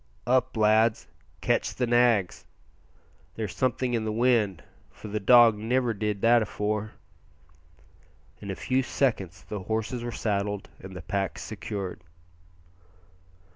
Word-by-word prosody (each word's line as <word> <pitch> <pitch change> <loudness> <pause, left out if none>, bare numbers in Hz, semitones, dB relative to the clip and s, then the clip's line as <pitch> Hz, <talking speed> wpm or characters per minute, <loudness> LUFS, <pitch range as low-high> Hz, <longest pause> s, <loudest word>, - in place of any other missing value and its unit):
"Up, 130 0 +1
lads! 110 +1 +3 0.3
catch - - 0
the 125 - 0
nags! 120 -6 +2 0.9
There's 105 -6 -4
something 130 -1 0
in 115 -2 0
the 110 - -2
wind, 115 -5 +1 0.3
for 110 - -11
the 105 +1 -2
dog 115 0 +6
niver 120 +2 0
did 105 -1 -3
that 120 +1 +5
afore." 105 0 -2 1.5
In 100 - -8
a 95 - -3
few 130 +5 0
seconds 100 -9 -1
the 105 - -6
horses 110 +5 -3
were 120 - -4
saddled 100 -2 -2
and 95 0 -10
the 90 - -8
packs 100 +2 -3
secured. 95 -2 -6
110 Hz, 130 wpm, -27 LUFS, 100-120 Hz, 1.5 s, dog